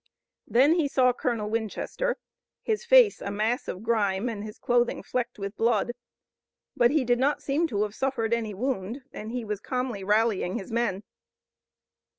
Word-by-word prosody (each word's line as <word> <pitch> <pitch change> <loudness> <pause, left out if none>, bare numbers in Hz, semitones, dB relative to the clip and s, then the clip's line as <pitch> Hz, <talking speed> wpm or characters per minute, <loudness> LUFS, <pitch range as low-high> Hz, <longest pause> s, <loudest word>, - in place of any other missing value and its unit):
Then 270 +7 +5
he 300 - +2
saw 255 -2 +3
Colonel 235 -4 -2
Winchester, 230 - -2 0.5
his 435 -1 -1
face - - +6
a - - -3
mass 220 +5 -1
of 185 - -5
grime 215 -1 +1
and 210 -3 -5
his 215 0 -8
clothing 240 0 +1
flecked 250 -1 -3
with 200 0 -5
blood. 230 0 +1 0.8
But 240 -1 +5
he 290 -1 +1
did 245 0 +2
not 285 +3 +1
seem 300 +5 +1
to 210 -7 0
have 210 -1 -4
suffered 235 -3 -1
any 220 -3 -1
wound 245 +1 -3
and 220 -4 -6
he 245 -1 -3
was 210 -2 -3
calmly 250 -4 -3
rallying 210 -2 +1
his 195 -2 -7
men. 225 -4 0
235 Hz, 165 wpm, -27 LUFS, 210-255 Hz, 0.8 s, face